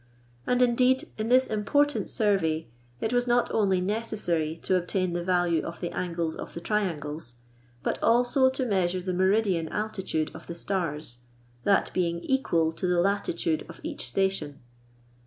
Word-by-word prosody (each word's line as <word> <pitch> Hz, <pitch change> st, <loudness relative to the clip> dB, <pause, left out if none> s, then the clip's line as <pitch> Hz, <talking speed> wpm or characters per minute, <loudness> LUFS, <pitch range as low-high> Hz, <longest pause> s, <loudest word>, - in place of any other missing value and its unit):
And 250 Hz, 0 st, +3 dB
indeed, 250 Hz, +2 st, +3 dB
in 220 Hz, +1 st, -1 dB
this 255 Hz, +1 st, +5 dB
important 285 Hz, +8 st, +1 dB
survey, 190 Hz, -, +1 dB, 0.3 s
it 220 Hz, -, -1 dB
was 245 Hz, 0 st, +2 dB
not 240 Hz, 0 st, +2 dB
only 195 Hz, -4 st, +3 dB
necessary 180 Hz, -6 st, -1 dB
to 190 Hz, -, +2 dB
obtain 185 Hz, 0 st, 0 dB
the 175 Hz, 0 st, -2 dB
value 175 Hz, -3 st, +2 dB
of 170 Hz, -, -6 dB
the 175 Hz, -, -3 dB
angles 170 Hz, -2 st, -2 dB
of -, -, -8 dB
the -, -, -3 dB
triangles, 160 Hz, -, -2 dB, 0.5 s
but -, -, -1 dB
also 245 Hz, +3 st, +4 dB
to 260 Hz, 0 st, -2 dB
measure 185 Hz, -4 st, +1 dB
the 185 Hz, 0 st, -2 dB
meridian 190 Hz, -2 st, +2 dB
altitude 195 Hz, -7 st, -2 dB
of 160 Hz, -, -11 dB
the 170 Hz, -, -5 dB
stars, 165 Hz, -9 st, -3 dB, 0.5 s
that 200 Hz, -, +3 dB
being 170 Hz, -2 st, 0 dB
equal 170 Hz, -12 st, +1 dB
to 180 Hz, +3 st, -3 dB
the 180 Hz, -1 st, +2 dB
latitude 175 Hz, -4 st, 0 dB
of 165 Hz, -, -10 dB
each 320 Hz, -1 st, -4 dB
station. 190 Hz, -7 st, -1 dB
185 Hz, 155 wpm, -27 LUFS, 170-220 Hz, 0.5 s, this